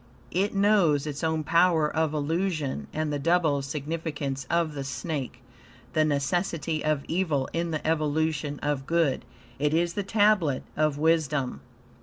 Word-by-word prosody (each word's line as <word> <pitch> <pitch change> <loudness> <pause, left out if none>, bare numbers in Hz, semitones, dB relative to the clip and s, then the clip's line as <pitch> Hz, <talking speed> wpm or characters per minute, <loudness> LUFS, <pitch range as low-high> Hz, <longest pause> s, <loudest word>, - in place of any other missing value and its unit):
It 200 +3 0
knows 195 -8 +3
its 145 0 -5
own 160 -1 0
power 165 -1 +4
of 160 0 0
illusion, 155 - -1
and 155 -1 -2
the 145 - -1
double 160 -2 +2
significance 145 -2 -4
of 170 -2 +1
the 140 -2 -4
snake; 130 -1 -4 0.5
the 155 - +3
necessity 155 +2 -1
of 155 -2 0
evil 160 -6 0
in 170 0 -1
the 155 -2 -3
evolution 155 -1 0
of 145 -2 -1
good. 165 -5 +1 0.4
It 150 +2 +1
is 170 +1 +1
the 205 - -1
Tablet 200 -8 +2
of 155 -2 +1
Wisdom. 150 -4 +1
155 Hz, 145 wpm, -27 LUFS, 145-170 Hz, 0.5 s, power